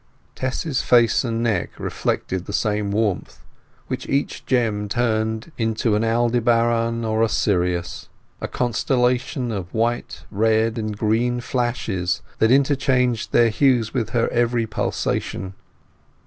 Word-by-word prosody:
Tess's 130 +1 -2
face 120 -2 +4
and 115 -2 -1
neck 110 -7 -1
reflected 95 -1 -2
the 100 - -5
same 105 -1 0
warmth, 105 -2 -2 0.4
which - - -5
each 140 +1 -1
gem 110 -5 0
turned 110 +3 -1
into 110 0 0
an 105 +2 +1
Aldebaran 115 0 +1
or 110 0 0
a 115 - +3
Sirius—a 90 -5 -2
constellation 125 +1 0
of 95 -4 -5
white, 120 +2 -2
red, 110 +2 +1
and 105 -1 -3
green 115 +3 +1
flashes, 120 -8 -2 0.2
that 110 - +4
interchanged 130 -3 +2
their 120 -1 +5
hues 115 -1 +2
with 120 -5 -1
her 120 -1 +1
every 120 -1 +1
pulsation. 95 -2 -2
115 Hz, 120 wpm, -22 LUFS, 110-120 Hz, 0.4 s, their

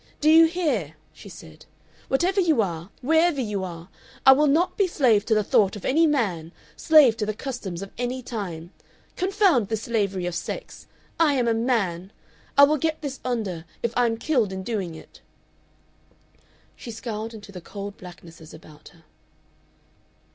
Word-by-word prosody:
"Do 305 +1 +4
you 325 +1 +8
hear!" 280 - -2 0.2
she 200 - -13
said 160 -3 -14 0.4
"whatever 365 +8 +1
you 320 -7 +2
are, 170 -4 -2
wherever 320 +2 +3
you 210 -6 -2
are! 170 -2 -8 0.4
I 265 - +10
will 295 +3 +4
not 325 +6 +2
be 395 - +2
slave 235 - +2
to 220 - +2
the 215 - +2
thought 195 0 +2
of 205 - -9
any 320 +5 +3
man, 190 - -1 0.2
slave 300 -8 +5
to 210 - -1
the 215 - -2
customs 210 -9 -6
of 195 - -10
any 250 +1 -3
time. 180 -8 -6 0.4
Confound 370 - +2
this 220 0 -3
slavery 200 -6 -1
of 175 - -3
sex! 175 - -7 0.3
I 305 -4 +4
am 245 -3 +1
a 230 - +3
man! 205 -6 -1 0.5
I 280 - +9
will 300 +2 +5
get 315 +1 -2
this 275 -2 -5
under 215 -10 -3 0.2
if 235 -1 -1
I 245 -1 +3
am 225 0 -2
killed 235 -6 0
in 190 0 -5
doing 190 -7 -4
it!" - - -15 1.5
She - - -10
scowled 225 -1 -6
into 205 -2 -12
the 180 -2 -9
cold 200 +3 -8
blacknesses 170 -3 -13
about 155 -1 -16
her. 165 -2 -19
225 Hz, 170 wpm, -24 LUFS, 185-280 Hz, 1.5 s, I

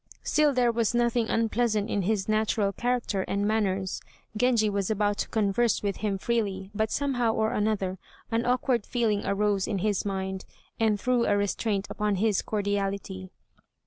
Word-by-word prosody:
Still 305 -1 +3
there 250 -3 +2
was 230 0 0
nothing 235 -1 +1
unpleasant 225 -2 +1
in 205 - 0
his 195 0 0
natural 215 -2 +1
character 240 -5 -1
and 200 +1 0
manners. 195 -3 0 0.3
Genji 230 -1 +3
was 200 -2 -1
about 205 -1 0
to - - -1
converse 220 +2 +1
with 200 -1 -1
him 205 -2 -1
freely, 200 -3 -2
but 220 +1 0
somehow 245 -5 0
or 220 0 +1
another 200 -3 -1 0.3
an 230 +1 +1
awkward 245 -2 +1
feeling 220 -4 0
arose 200 -1 +1
in 210 - -1
his 205 0 0
mind, 190 -1 -3 0.4
and 220 -2 +2
threw 245 +2 +1
a 205 - +3
restraint 205 0 -1
upon 210 -1 0
his 205 0 +1
cordiality. 200 -2 -2
210 Hz, 160 wpm, -27 LUFS, 200-230 Hz, 0.4 s, Still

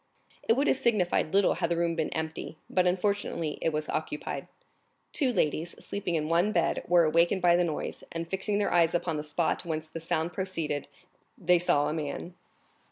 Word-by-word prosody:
It - - +3
would 275 +5 +1
have 270 - +2
signified 185 -8 +1
little 200 0 +4
had 170 -1 -1
the 170 - 0
room 170 0 +1
been 160 -2 -1
empty, 160 0 -4
but 180 -1 +3
unfortunately 180 -4 -1
it 165 - +1
was 155 0 -2
occupied. 155 -1 -4 0.6
Two 275 -6 +2
ladies, 170 -4 0
sleeping 195 -4 -2
in 155 -1 0
one 170 +6 +2
bed, 170 -4 +1
were 175 -1 +5
awakened 170 +4 +3
by 175 -1 +6
the 175 - +3
noise, 160 -3 -4
and 165 0 -4
fixing 195 +3 -1
their 205 - 0
eyes 170 -1 +4
upon 165 -2 -1
the 150 - -3
spot 155 +2 0
whence 155 -2 -3
the 160 +1 -7
sound 165 +1 -1
proceeded, 165 -7 -2 0.5
they 180 0 +3
saw 145 -4 +2
a - - -1
man. 155 +3 -4
170 Hz, 190 wpm, -29 LUFS, 160-185 Hz, 0.6 s, by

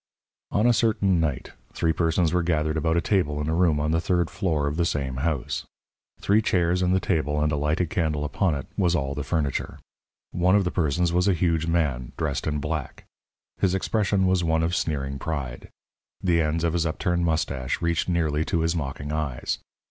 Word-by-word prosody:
On 105 +3 +1
a 120 - +5
certain 105 -6 +2
night 75 -5 -2 0.2
three 80 -1 +1
persons 85 0 +1
were 90 - +3
gathered 80 -2 0
about 80 +1 +1
a - - +3
table 80 -8 +1
in 75 - -2
a 80 - 0
room 85 -3 +3
on 75 +1 0
the 80 +1 +1
third 85 -2 0
floor 80 -8 0
of 70 +1 -1
the 85 - +1
same 70 -5 -2
house. 75 -1 -2 0.6
Three 105 +2 +3
chairs 90 -3 +1
and 90 0 +2
the 95 - +3
table 75 -5 0
and 75 0 +1
a - - +1
lighted 75 +4 0
candle 75 -4 0
upon 85 +2 0
it 70 - -4
was 90 -3 +2
all 70 -4 -1
the 75 - -4
furniture. 75 -3 -2 0.5
One 90 +2 +3
of 100 - +4
the 90 - -1
persons 85 +1 +1
was 90 +2 +2
a 95 - +3
huge 80 -2 +1
man, 75 -8 0
dressed 75 -5 -2
in 75 -1 0
black. 75 -1 -4 0.5
His 95 -1 +2
expression 100 -1 +1
was 95 -1 +2
one 80 -1 +1
of 85 +2 0
sneering 70 -5 -2
pride. 70 -5 -4 0.5
The 85 -2 +2
ends 80 +1 0
of 85 -1 +1
his 85 -1 +1
upturned 85 +2 -1
moustache 80 -6 -1
reached 85 +1 0
nearly 80 -3 +1
to 85 - 0
his 80 +1 +1
mocking 70 -1 -4
eyes. 75 -5 -2
80 Hz, 200 wpm, -25 LUFS, 75-90 Hz, 0.6 s, a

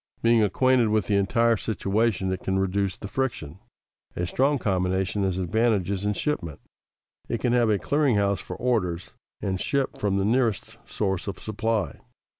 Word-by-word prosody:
Being 115 0 +5
acquainted 125 +4 +3
with 105 -3 +1
the 105 - +1
entire 115 +3 +2
situation, 105 -2 0
it 95 - -2
can 95 0 -1
reduce 95 0 0
the - - -7
friction. 95 - -3 0.6
A 90 - -1
strong 135 +10 +1
combination 95 -2 0
has 95 -2 0
advantages 100 0 0
in 105 - +1
shipment. 95 - -3 0.7
It 115 - -1
can 120 +1 +1
have 120 -2 +3
a 105 - +3
clearing 140 - +1
house 100 -1 +1
for - - -7
orders 90 -9 -1 0.3
and 95 -1 -1
ship 140 -2 -1
from 100 -2 0
the 100 - +1
nearest 115 -2 0
source 95 -3 -2
of 100 - -4
supply. 110 -1 -2
105 Hz, 165 wpm, -25 LUFS, 95-115 Hz, 0.7 s, Being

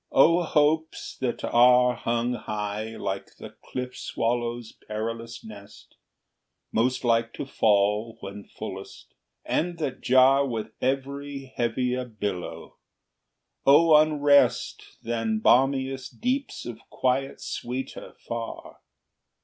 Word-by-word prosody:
O 165 +6 +5
hopes 155 0 +1
that 125 -2 -3
are 125 +1 +5
Hung 120 +1 -1
high, 105 -1 -4
like 95 0 -4
the - - -9
cliff 125 0 -5
swallow's 120 0 -2
perilous 115 +2 -6
nest, 100 -2 -13 0.8
Most 125 +3 +1
like 115 -1 +2
to - - -5
fall 105 -1 +1
when 100 +1 -8
fullest, - - -9 0.3
and 175 +1 -1
that 145 -5 -3
jar 130 +2 +5
With 115 -5 -3
every 135 +1 -3
heavier 125 +2 0
billow! 105 -6 -5 0.9
O 155 +3 +6
unrest 145 -2 +4 0.2
Than 115 -1 -1
balmiest 135 +2 +2
deeps 260 +3 -2
of 120 -2 -7
quiet 130 +1 -1
sweeter 130 +2 -6
far! 115 -1 -6
125 Hz, 105 wpm, -26 LUFS, 115-135 Hz, 0.9 s, O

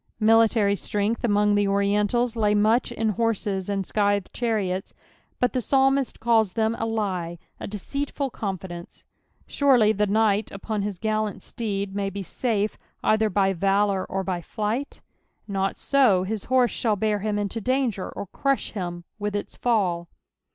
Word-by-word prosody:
(Military 220 -2 +4
strength 205 +3 -1
among 210 -2 +3
the 205 0 +2
Oriental!) 205 +4 +2
lay 210 -2 +2
much 220 +4 +3
in 225 -1 -1
horses 210 -3 -1
and 195 -1 -1
scjthcd 205 -1 +1
chtiiiots^ut 200 -6 -2 0.6
tlie 255 - 0
psalmist 270 0 +2
calls 225 -4 +2
tfiem 220 0 +1
a 225 - -1
lie, 185 -6 -2 0.2
a - - -5
deceitful 275 +6 -3
confidence 190 -5 -6 0.4
J - - -15
Surely 250 -7 +4
tile 210 0 +1
knight 215 0 +2
upon 205 +1 -4
his 200 -2 -3
gallant 215 +1 -2
steed 200 -4 -3
may 200 -1 -1
be 195 0 -6 0.2
Mie, 215 -4 +2 0.3
cither 215 0 +3
by 195 0 +2
valour 195 +1 +1
or 195 0 -3
Ty 185 -2 -2
flight! 220 - -3 0.5
Not 195 -1 -1
so, 245 -10 +3
his 210 +1 -4
horse 255 -1 +3
shall 220 -3 0
bear 210 +1 0
bim 210 +1 -1
into 205 +2 -2
dHnser 250 -5 0
or - - -4
crush 275 +7 -1
him 175 -4 -5 0.2
with 205 0 -2
its 205 - -4
fall. 180 -8 0
210 Hz, 155 wpm, -25 LUFS, 195-225 Hz, 0.6 s, Military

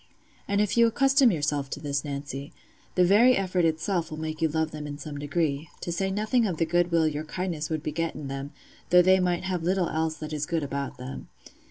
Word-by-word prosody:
And 200 0 +1
if 210 +2 0
you 235 0 +7
accustom 270 +2 +4
yourself 145 -4 -1
to - - -5
this, 140 -2 -2
Nancy, 140 -1 -5 0.4
the 180 - +5
very 230 +7 +6
effort 185 -2 +1
itself 165 +2 0
will 155 - -6
make 155 0 -5
you 160 - +4
love 160 0 -1
them 150 -1 -6
in 145 0 -6
some 145 0 -7
degree—to 145 +2 -2
say 190 +3 -1
nothing 215 +4 +1
of 175 -5 -3
the 165 - +2
goodwill 170 -1 +2
your 150 0 -2
kindness 165 -2 -3
would 160 -1 -2
beget 165 +1 -2
in 145 -2 -6
them, 135 +1 -5 0.4
though 180 0 +7
they 190 +1 +5
might 180 -1 0
have 185 -2 -2
little 180 +1 +1
else 160 0 -1
that 155 +1 -6
is 150 0 -2
good 165 -3 -1
about 140 -2 -4
them. 130 +1 -8
160 Hz, 215 wpm, -27 LUFS, 145-185 Hz, 0.4 s, you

